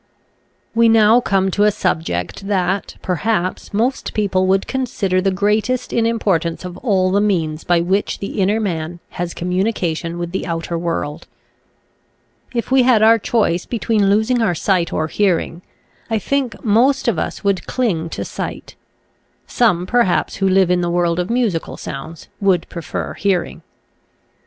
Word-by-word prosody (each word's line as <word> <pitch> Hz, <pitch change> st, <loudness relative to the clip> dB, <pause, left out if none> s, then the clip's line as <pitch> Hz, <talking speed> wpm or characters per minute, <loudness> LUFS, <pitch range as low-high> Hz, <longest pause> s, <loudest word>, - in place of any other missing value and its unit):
We 230 Hz, 0 st, +4 dB
now 225 Hz, +1 st, +5 dB
come 195 Hz, -3 st, +1 dB
to 205 Hz, -, +1 dB
a 210 Hz, -, +6 dB
subject 160 Hz, -, -2 dB
that, 190 Hz, -1 st, -1 dB
perhaps, 185 Hz, +1 st, -1 dB
most 235 Hz, +6 st, -1 dB
people 190 Hz, -3 st, +1 dB
would 195 Hz, +1 st, +2 dB
consider 205 Hz, -8 st, -1 dB
the 195 Hz, -, +2 dB
greatest 210 Hz, +6 st, 0 dB
in 230 Hz, -1 st, +2 dB
importance 185 Hz, -7 st, 0 dB
of 180 Hz, -1 st, -6 dB
all 190 Hz, -5 st, +1 dB
the 200 Hz, +2 st, +2 dB
means 165 Hz, -7 st, 0 dB
by 175 Hz, -1 st, +2 dB
which 190 Hz, +4 st, 0 dB
the 200 Hz, 0 st, -4 dB
inner 205 Hz, +4 st, +2 dB
man 170 Hz, -4 st, -3 dB
has 175 Hz, -1 st, -5 dB
communication 180 Hz, -2 st, -1 dB
with 175 Hz, 0 st, -4 dB
the 190 Hz, -, -3 dB
outer 170 Hz, 0 st, -3 dB
world. 165 Hz, -2 st, -3 dB, 1.2 s
If 235 Hz, 0 st, -3 dB
we 265 Hz, 0 st, +5 dB
had 245 Hz, -4 st, +4 dB
our 225 Hz, +1 st, +6 dB
choice 200 Hz, -6 st, 0 dB
between 220 Hz, -4 st, +1 dB
losing 220 Hz, +4 st, +2 dB
our 190 Hz, -6 st, +1 dB
sight 175 Hz, 0 st, 0 dB
or 155 Hz, -, 0 dB
hearing 175 Hz, -1 st, 0 dB, 0.5 s
I 225 Hz, -, +1 dB
think 260 Hz, +1 st, -2 dB
most 245 Hz, +6 st, +3 dB
of 220 Hz, -9 st, +1 dB
us -, -, -4 dB
would 200 Hz, -2 st, 0 dB
cling 185 Hz, -11 st, -1 dB
to -, -, -5 dB
sight. -, -, -6 dB, 0.7 s
Some 180 Hz, -8 st, +1 dB
perhaps 235 Hz, -3 st, +1 dB
who 195 Hz, -1 st, +1 dB
live 190 Hz, -1 st, +3 dB
in 180 Hz, 0 st, +2 dB
the 175 Hz, -, -1 dB
world 170 Hz, 0 st, +1 dB
of 180 Hz, -, -2 dB
musical 230 Hz, -9 st, -1 dB
sounds 155 Hz, +4 st, -8 dB
would 190 Hz, -4 st, +2 dB
prefer 165 Hz, -3 st, -5 dB
hear 190 Hz, -3 st, +1 dB
ing. -, -, -11 dB
195 Hz, 160 wpm, -19 LUFS, 175-220 Hz, 1.2 s, a